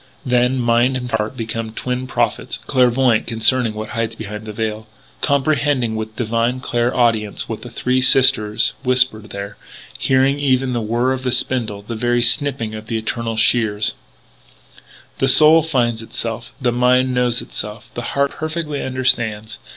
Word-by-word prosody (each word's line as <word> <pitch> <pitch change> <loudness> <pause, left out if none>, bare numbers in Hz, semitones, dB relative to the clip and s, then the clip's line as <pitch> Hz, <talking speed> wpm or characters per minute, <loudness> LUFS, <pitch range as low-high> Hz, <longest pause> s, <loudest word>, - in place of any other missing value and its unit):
Then 125 +1 +2
mind 120 +1 +2
and 125 -1 -6
heart 110 +3 -2
become 115 -1 -4
twin 125 +2 -4
prophets, - - -1
clairvoyant 125 -2 +2
concerning 115 0 +2
what 110 0 -6
hides 115 -1 -3
behind 105 -1 -7
the - - -5
veil; 110 0 -4 0.3
comprehending 140 -4 +1
with 110 0 -5
divine 115 +2 -1
clair 120 -1 -1
audience 115 -4 +1
what 110 - -6
the 120 - -9
Three 125 +2 -1
Sisters 115 -4 +4
whisper 125 -3 +4
there 100 -1 -8 0.4
hearing 135 +2 +2
even 130 -2 +1
the 120 - -1
whirr 120 +4 0
of 130 - -4
the 130 -1 -2
spindle 120 -5 -1
the 115 - -6
very 120 +1 0
snipping 120 -3 0
of 110 0 -8
the 115 - -2
Eternal 115 0 -3
Shears! 110 -2 +2 1.3
The - - +2
soul 155 +2 +7
finds 120 -7 -1
itself; 115 +1 -5
the 125 -3 +1
mind 125 +1 +2
knows 125 -1 +1
itself; 105 +2 -7
the 120 - -5 0.2
heart 140 0 +2
perfectly 155 -2 -4
understands. 120 -4 -1
120 Hz, 155 wpm, -19 LUFS, 110-130 Hz, 1.3 s, soul